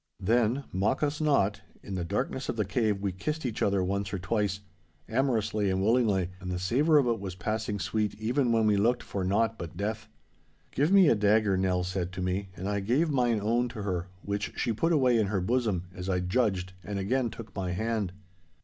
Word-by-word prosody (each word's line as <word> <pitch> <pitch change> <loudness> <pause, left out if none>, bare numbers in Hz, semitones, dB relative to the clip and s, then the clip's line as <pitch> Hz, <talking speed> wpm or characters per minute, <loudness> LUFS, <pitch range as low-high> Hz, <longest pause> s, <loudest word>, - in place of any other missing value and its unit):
Then 120 +6 +2
(mock 100 +10 0
us 150 +1 -1
not) 105 -9 +2 0.2
in 100 - -7
the 90 -2 -2
darkness 125 +8 -2
of - - -1
the 105 -2 0
cave 105 0 0
we 100 -1 0
kissed 150 - -4
each 120 -4 -3
other 100 -2 +2
once 100 +1 -2
or 100 - -2
twice, 100 +2 -1 0.5
amorously 110 -5 +1
and 95 0 0
willingly, 105 -5 +2
and 90 -1 -5
the 90 - -2
savour 135 - +3
of 140 - +4
it 115 -3 0
was 95 -2 -6
passing 105 +3 -2
sweet 105 0 -1
even 120 +4 0
when 115 -1 +3
we 105 -1 +3
looked 120 +5 +2
for 100 - -4
naught 110 +4 +1
but 85 -1 -7
death. 110 +2 -3 0.6
'Give 145 +6 +1
me 195 -3 +7
a - - +6
dagger,' 105 -1 +3
Nell 95 -1 +1
said 90 -1 -3
to 90 - -5
me, 95 +2 -2
and 95 - -5
I 100 0 0
gave 130 +11 +1
mine 120 -5 +2
own 120 +4 +1
to 110 -3 -6
her, 90 -3 -2 0.2
which 100 0 -3
she 115 - 0
put 165 +10 +1
away 130 -7 +4
in 105 - +2
her 95 -1 0
bosom, 105 -2 0
as 90 +1 -6
I 90 -1 +1
judged, 95 -1 0
and 100 0 -4
again 120 +6 0
took 110 0 -10
my 95 -2 -2
hand. 110 0 -1
105 Hz, 210 wpm, -29 LUFS, 95-120 Hz, 0.6 s, me